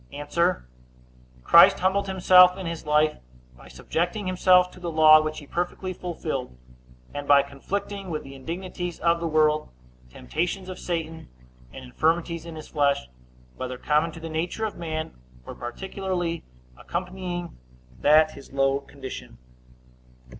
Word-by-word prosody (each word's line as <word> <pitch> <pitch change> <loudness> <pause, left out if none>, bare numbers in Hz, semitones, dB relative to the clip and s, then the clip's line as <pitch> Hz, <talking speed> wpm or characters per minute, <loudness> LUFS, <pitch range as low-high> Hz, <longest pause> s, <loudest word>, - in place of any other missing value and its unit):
A. 170 +5 0 0.9
Christ - - +7
humbled 195 +2 +1
himself 180 -1 +6
in 190 - -6
his 165 -2 -6
life, 150 0 +3 0.4
by - - -16
subjecting 170 - -3
himself 180 0 +4
to - - -14
the 175 -1 -4
law, 155 -1 +7
which 155 0 -4
he 145 - -9
perfectly 180 +4 -3
fulfilled; 155 - -5 0.6
and 145 0 -6
by 140 -1 +6
conflicting 195 +8 -5
with 155 -2 -4
the 135 - -11
indignities 175 +4 -6
of 170 0 +2
the 170 - -2
world, 155 -1 +2 0.4
temptations 180 - -3
of 185 - -7
Satan, 165 - -4 0.4
and - - -10
infirmities 165 - -1
in 165 - -8
his 155 - -9
flesh, 140 - +1 0.5
whether 130 0 -5
common 150 +5 +1
to 165 - -9
the 165 - -7
nature 170 +7 -2
of 215 - -4
man, 160 -2 -4 0.3
or - - -7
particularly 175 +5 -4 0.3
accompanying 180 - -5 0.4
that 155 +1 +5
his 140 - -13
low 135 0 +1
condition. 130 - -10
165 Hz, 140 wpm, -25 LUFS, 145-180 Hz, 0.9 s, Christ